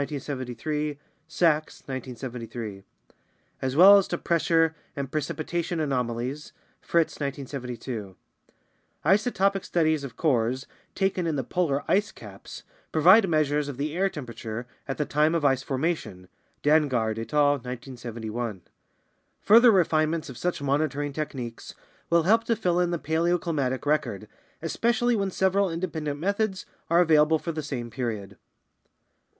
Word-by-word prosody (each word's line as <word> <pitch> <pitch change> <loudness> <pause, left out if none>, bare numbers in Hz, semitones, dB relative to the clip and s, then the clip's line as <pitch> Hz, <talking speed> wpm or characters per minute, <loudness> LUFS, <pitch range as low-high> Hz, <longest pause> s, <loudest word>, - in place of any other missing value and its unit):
1973; 145 +1 -3 0.3
Sachs, 160 -2 +1
1973), 120 -5 -6 0.8
as 130 0 -2
well 195 +5 +9
as 195 - -2
to 175 - -2
pressure 165 -1 +2 0.2
and 140 -1 -4
precipitation 165 +3 -2
anomalies 130 0 -2 0.3
(Fritts, 170 -2 0
1972). 125 -7 -5 0.9
Isotopic 195 +1 +2
studies 155 -3 +1
of 125 -4 -8
cores 130 -3 +1 0.3
taken 190 -3 0
in 160 - 0
the 135 - -1
polar 145 0 0
ice 210 +2 +2
caps 100 -3 -11 0.3
provide 185 +6 +6
measures 150 -2 +1
of 140 -3 -6
the 150 +3 -3
air 195 +2 +2
temperature 120 -6 -6 0.2
at 135 - -3
the 150 - 0
time 150 +3 +2
of 160 -3 0
ice 135 -2 +3
formation 135 - -3 0.4
(Dansgaard 130 -8 +2
et 115 - -6
al., 145 -1 +4
1971). 120 -4 -6 0.8
Further 235 +4 +7
refinements 165 -5 +2
of - - -11
such 175 -5 -2
monitoring 145 0 0
tech 155 +1 -3
niques 120 -4 -7 0.3
will 170 -1 +4
help 225 +6 +4
to 230 - +1
fill 180 -4 +1
in 175 -1 +2
the 175 - -1
paleoclimatic 160 -4 0
record, 145 -9 -1 0.4
especially 235 +7 +1
when 200 -2 0
several 190 +1 +1
independent 160 -4 -3
methods 200 +2 -1 0.2
are 170 +1 +5
available 160 -1 +4
for 170 - -4
the 155 -1 -4
same 125 -5 -5
period. 110 -5 -4
150 Hz, 135 wpm, -26 LUFS, 130-170 Hz, 0.9 s, well